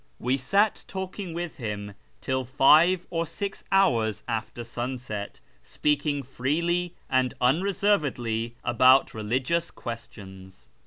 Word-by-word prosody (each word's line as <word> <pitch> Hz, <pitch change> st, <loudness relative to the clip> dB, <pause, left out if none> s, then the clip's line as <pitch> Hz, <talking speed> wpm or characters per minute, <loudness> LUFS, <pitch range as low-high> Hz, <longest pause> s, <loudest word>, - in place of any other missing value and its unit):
We 125 Hz, +2 st, 0 dB
sat 200 Hz, -, +1 dB
talking 190 Hz, -1 st, -5 dB
with 170 Hz, 0 st, -5 dB
him 105 Hz, -4 st, -5 dB, 0.3 s
till 130 Hz, 0 st, -1 dB
five 155 Hz, +8 st, +5 dB
or 165 Hz, -1 st, -1 dB
six 195 Hz, +4 st, -5 dB
hours 115 Hz, -, +2 dB
after 115 Hz, 0 st, -3 dB
sunset, 120 Hz, -3 st, -5 dB, 0.2 s
speaking 145 Hz, -, -1 dB
freely 170 Hz, +7 st, -1 dB
and 130 Hz, -1 st, +1 dB
unreservedly 130 Hz, -, +1 dB
about 130 Hz, +3 st, +5 dB
religious 130 Hz, +10 st, -1 dB
questions. 95 Hz, -, -9 dB
130 Hz, 105 wpm, -26 LUFS, 115-170 Hz, 0.3 s, five